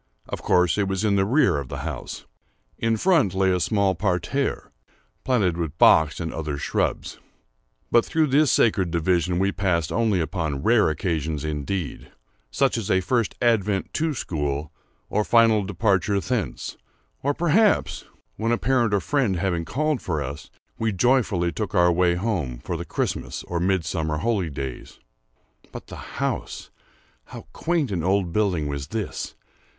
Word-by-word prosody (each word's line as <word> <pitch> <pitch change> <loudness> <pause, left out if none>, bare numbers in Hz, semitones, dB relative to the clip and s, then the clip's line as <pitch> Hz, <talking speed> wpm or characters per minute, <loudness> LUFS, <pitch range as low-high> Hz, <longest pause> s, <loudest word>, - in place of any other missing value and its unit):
Of - - -5
course 90 +1 +2
it 100 - +1
was 95 +2 -1
in 100 -2 +2
the 95 -1 +2
rear 125 - +3
of 70 - -6
the - - -6
house. - - -6 0.5
In 115 -1 +1
front 150 - +2
lay 95 0 +3
a 90 - +1
small 100 0 +2
parterre, 95 +9 -1 0.5
planted 100 -10 +1
with 85 -2 -4
box 80 -3 +5
and 80 -2 -4
other 75 -3 -3
shrubs, - - -2 0.7
but 120 - +5
through 160 -1 +1
this 145 0 +3
sacred 95 -6 +3
division 85 +1 +1
we 95 +2 +2
passed 90 -5 0
only 110 -4 +1
upon 80 -4 -2
rare 115 -5 +4
occasions 80 -3 -2
indeed—such 85 - -3
as 110 -2 -5
a 95 - +4
first 115 +5 0
advent 105 -5 +1
to 155 -1 0
school 75 - -3 0.4
or 105 - 0
final 115 -1 +4
departure 100 +1 +1
thence, 115 +1 -3 0.4
or 145 +1 0
perhaps, 185 +6 +2 0.3
when 115 +2 0
a 120 - +2
parent 120 -5 +2
or 100 - +1
friend 125 - +1
having 85 -2 -1
called 150 - -1
for 80 -4 -2
us, 70 +3 -7 0.3
we 110 -1 +1
joyfully 100 -5 +2
took 105 0 -4
our 90 -1 +5
way 85 0 +2
home 85 - -2
for 85 +8 -5
the 85 +1 -5
Christmas - - -3
or 85 - -3
Midsummer 85 -4 0
holidays. 80 - -3 0.7
But - - -8
the - - -10
house!—how - - -7
quaint 160 -8 -1
an 85 -5 -2
old 95 -1 +1
building 95 -7 +1
was 70 -1 -4
this! 110 +3 -4
95 Hz, 155 wpm, -24 LUFS, 85-115 Hz, 0.7 s, box